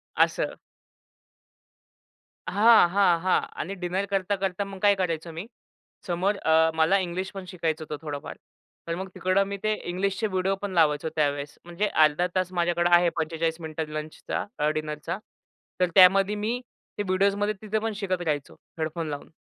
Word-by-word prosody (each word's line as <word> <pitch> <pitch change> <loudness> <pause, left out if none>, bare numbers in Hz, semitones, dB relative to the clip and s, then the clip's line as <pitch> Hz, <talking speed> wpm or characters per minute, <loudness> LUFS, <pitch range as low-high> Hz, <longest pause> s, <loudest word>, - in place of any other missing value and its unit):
असं. - - +1 1.9
हां, 220 -3 +6
हां, 180 -2 +3
हां. 185 +1 +3 0.2
आणि 195 +5 -4
डिनर 185 +1 -2
करता, 195 0 +1
करता 195 0 -2
मग 195 -1 -9
काय 205 -1 +5
करायचो 170 -3 -2
मी 165 +7 -7 0.6
समोर 185 +4 +1
अ, 160 -2 +3
मला 160 +5 +4
इंग्लिशपण 185 +2 -4
शिकायचं 165 -3 -2
होतं 150 -1 -5
थोडंफार. 145 -2 -5 0.5
तर 170 - -1
मग 190 +2 -5
तिकडं 185 +1 +2
मी 200 0 -4
ते 215 0 +2 0.2
इंग्लिशचे 195 +4 -1
व्हिडिओपण 195 +1 -1
लावायचो 160 -2 +2
त्यावेळेस. 145 -1 -1
म्हणजे 175 +5 -1
अर्धा 155 0 +3
तास 185 -1 0
माझ्याकडं 175 0 +1
आहे 175 0 +4
45 165 0 -1
मिनिटं 160 -1 -4
लंचचा 155 0 -4
अ, 150 +1 +2
डिनरचा. 155 -1 -3 0.6
तर 180 -1 +3
त्यामध्ये 195 +2 +6
मी 220 +4 -2 0.4
ते 205 - -1
व्हिडिओसमध्ये 200 +2 +1
तिथे 215 0 -1
पण 225 0 -2
शिकत 185 -3 -2
राहायचो 150 -5 -2 0.3
हेडफोन 160 +1 -2
लावून. 145 -1 -6
180 Hz, 150 wpm, -26 LUFS, 160-195 Hz, 1.9 s, हां